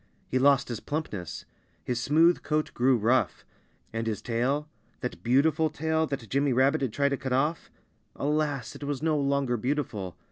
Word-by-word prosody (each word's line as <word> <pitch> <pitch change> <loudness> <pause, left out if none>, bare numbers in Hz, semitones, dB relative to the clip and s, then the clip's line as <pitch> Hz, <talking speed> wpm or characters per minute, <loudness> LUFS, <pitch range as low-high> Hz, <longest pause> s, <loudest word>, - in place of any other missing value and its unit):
He 130 - 0
lost 140 0 +4
his 120 -3 -3
plumpness. 100 - -5 0.4
His 120 -2 -2
smooth 165 +6 +4
coat 155 0 -1
grew 125 +1 +3
rough. 120 +4 +1 0.5
And 115 0 -2
his 110 -2 -1
tail 130 +6 0 0.3
that 125 - -4
beautiful 150 +6 +3
tail 160 +1 0
that 135 -6 -4
Jimmy 140 +3 +1
Rabbit 135 +5 +3
had 130 -4 0
tried 140 +4 +1
to 140 - -1
cut 130 -1 -3
off 150 +5 0 0.5
alas! 145 -3 -1
it - - -9
was 145 0 -3
no 160 -1 +2
longer 140 -3 +1
beautiful. 110 - -3
140 Hz, 170 wpm, -28 LUFS, 120-150 Hz, 0.5 s, lost